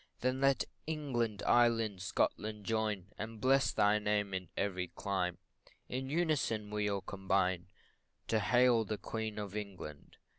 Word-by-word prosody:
Then 130 Hz, +1 st, 0 dB
let 135 Hz, -4 st, +4 dB, 0.2 s
England, 120 Hz, -9 st, -1 dB
Ireland, 115 Hz, -5 st, +3 dB
Scotland, 105 Hz, +2 st, -1 dB
join, 105 Hz, -4 st, -1 dB
And 110 Hz, +1 st, -5 dB
bless 135 Hz, +2 st, +4 dB
thy 105 Hz, +1 st, +3 dB
name 105 Hz, -1 st, 0 dB
in 90 Hz, -3 st, -3 dB
every 95 Hz, -2 st, -1 dB
clime 90 Hz, -1 st, -2 dB, 0.5 s
In 130 Hz, +1 st, -3 dB
unison 145 Hz, -10 st, 0 dB
we 105 Hz, -1 st, 0 dB
all 100 Hz, -1 st, -1 dB
combine 95 Hz, -2 st, 0 dB, 0.6 s
To 110 Hz, -, +3 dB
hail 120 Hz, 0 st, +4 dB
the 105 Hz, 0 st, -3 dB
Queen 110 Hz, -1 st, -4 dB
of 105 Hz, -1 st, -5 dB
England. 95 Hz, -8 st, -7 dB
105 Hz, 140 wpm, -34 LUFS, 100-120 Hz, 0.6 s, let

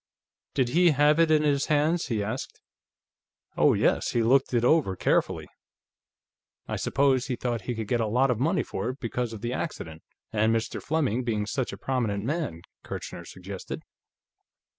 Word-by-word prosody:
"Did 130 Hz, -4 st, +2 dB
he 175 Hz, +6 st, +5 dB
have 150 Hz, +1 st, +4 dB
it 165 Hz, -1 st, +5 dB
in 155 Hz, -1 st, +4 dB
his 145 Hz, -2 st, +1 dB
hands?" 155 Hz, +3 st, +2 dB
he 110 Hz, -5 st, -1 dB
asked. 110 Hz, +6 st, -5 dB, 1.0 s
"Oh, -, -, +4 dB
yes; -, -, +1 dB
he 120 Hz, -, +2 dB
looked 130 Hz, +4 st, +3 dB
it 120 Hz, -1 st, +2 dB
over 130 Hz, -10 st, +3 dB
carefully. -, -, 0 dB, 1.2 s
I -, -, -2 dB
suppose 135 Hz, -2 st, +2 dB
he 130 Hz, -, -1 dB
thought 120 Hz, -2 st, -2 dB
he 120 Hz, -, -1 dB
could 110 Hz, -2 st, -4 dB
get 120 Hz, 0 st, +1 dB
a 110 Hz, -, 0 dB
lot 125 Hz, +5 st, +3 dB
of 115 Hz, -, -1 dB
money 165 Hz, +8 st, +1 dB
for 100 Hz, +5 st, -3 dB
it, 130 Hz, +2 st, -6 dB
because 120 Hz, 0 st, -2 dB
of 110 Hz, -, -8 dB
the 120 Hz, +1 st, -2 dB
accident, 80 Hz, -, -5 dB, 0.3 s
and 110 Hz, +1 st, +3 dB
Mr. 115 Hz, -, -2 dB
Fleming 135 Hz, -6 st, 0 dB
being 110 Hz, -3 st, -1 dB
such 125 Hz, +4 st, -2 dB
a -, -, -7 dB
prominent 115 Hz, -7 st, -1 dB
man," 135 Hz, -, -3 dB, 0.2 s
Kirchner 85 Hz, -, -7 dB
suggested. 95 Hz, +2 st, -7 dB
125 Hz, 175 wpm, -27 LUFS, 110-145 Hz, 1.2 s, he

